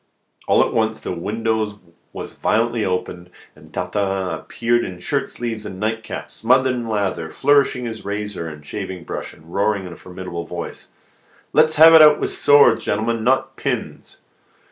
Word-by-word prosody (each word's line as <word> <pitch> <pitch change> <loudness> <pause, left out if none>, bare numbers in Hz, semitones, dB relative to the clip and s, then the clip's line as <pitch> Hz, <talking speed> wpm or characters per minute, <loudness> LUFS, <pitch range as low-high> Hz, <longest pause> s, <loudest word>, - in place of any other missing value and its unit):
All - - +5
at - - -3
once 110 -1 0
the - - -5
window 105 +3 -2 0.3
was - - -7
violently 115 0 0
opened, 90 -1 -3 0.3
and 75 +1 -17
Tartarin 95 +1 -2
appeared 120 0 -1
in 90 -1 -6
shirt 90 - -2
sleeves 115 -3 -5
and 95 -3 -8
nightcap, 110 +1 -4
smothered 130 +3 +2
in 120 -2 -4
lather, 100 -6 -1
flourishing 140 - +2
his 110 -1 -6
razor 100 -4 -4
and 75 -1 -11
shaving 95 +1 -6
brush, - - -6
and 80 +2 -17
roaring 100 0 +1
with 90 -2 -8
a - - -13
formidable 90 -2 -7
voice: 85 -1 -7 0.7
"Let's 155 - +4
have 160 +1 +8
it 160 - +9
out 150 -1 +7
with - - 0
swords, 140 -6 +5
gentlemen, 110 +2 -1
not 130 +3 +1
pins!" - - -4
105 Hz, 165 wpm, -20 LUFS, 90-115 Hz, 0.7 s, it